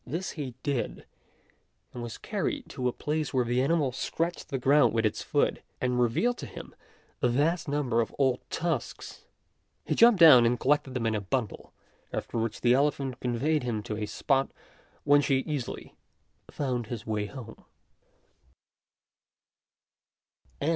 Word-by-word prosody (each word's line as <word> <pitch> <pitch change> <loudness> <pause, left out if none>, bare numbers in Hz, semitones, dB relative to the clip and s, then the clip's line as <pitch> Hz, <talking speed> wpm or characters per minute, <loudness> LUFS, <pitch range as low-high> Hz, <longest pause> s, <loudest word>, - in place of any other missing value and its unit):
This 170 +8 -4
he 135 -6 -6
did, 140 -5 -2 0.9
and 125 - -6
was 120 -2 -6
carried - - -3
to 125 - -2
a - - +1
place 150 +2 -3
where 125 -2 +2
the 120 +2 +1
animal 145 -1 +1
scratched 165 +7 -3
the 135 - -1
ground 140 +1 +4
with 115 -1 +2
its 105 - 0
foot, - - 0 0.2
and 125 -1 0
revealed 225 - +1
to - - -6
him - - -10 0.5
a 125 - +3
vast 150 +8 +1
number 140 -5 +1
of 115 - -3
old 130 -3 +2
tusks. 165 -7 -4 0.6
He - - 0
jumped 230 -4 +6
down 150 -8 +9
and 120 +1 +2
collected 140 -1 +1
them 120 -3 -1
in 110 - +1
a 105 - -1
bundle, 115 +2 -3 0.4
after 115 - -3
which 115 -1 -3
the 120 0 +4
elephant 135 -2 0
conveyed 135 +6 0
him 115 -4 -3
to 105 - -4
a 105 -1 -3
spot 135 +3 0 0.5
whence 145 0 +4
he 135 -2 +2
easily 145 -4 -5 0.6
found 125 -5 -2
his 115 -1 -6
way 105 -2 -2
home. 120 -2 -10
130 Hz, 155 wpm, -28 LUFS, 120-145 Hz, 0.9 s, down